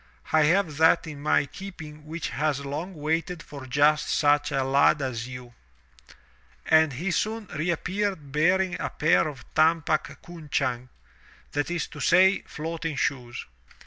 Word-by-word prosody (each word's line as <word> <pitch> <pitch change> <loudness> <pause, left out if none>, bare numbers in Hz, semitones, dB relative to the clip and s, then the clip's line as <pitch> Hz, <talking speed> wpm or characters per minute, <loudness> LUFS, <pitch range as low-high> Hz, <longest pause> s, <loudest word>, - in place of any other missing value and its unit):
"I 155 -1 +5
have 170 -2 +1
that 160 +2 +4
in 150 -3 -8
my 150 -1 +2
keeping 155 -2 -10
which 165 +2 -4
has 145 -1 -1
long 160 +7 -5
waited 160 +3 -2
for 140 -3 -10
just 150 +3 +3
such 145 -1 +2
a 135 - 0
lad 140 +3 +3
as 125 -4 -3
you." 125 -1 -9 1.1
And 160 -2 +4
he 175 +9 -2
soon 220 +5 -1
reappeared 175 0 -2
bearing 180 +4 +1
a - - -2
pair 155 +1 +2
of 135 -5 -8
tumpak 155 -1 +1
cunchang 140 -7 -3 0.3
— - - -27
that 145 +2 -1
is 175 -3 -1
to 150 - -11
say, 185 +5 +4
floating 160 0 -4
shoes. 125 -3 -2
155 Hz, 145 wpm, -26 LUFS, 140-170 Hz, 1.1 s, I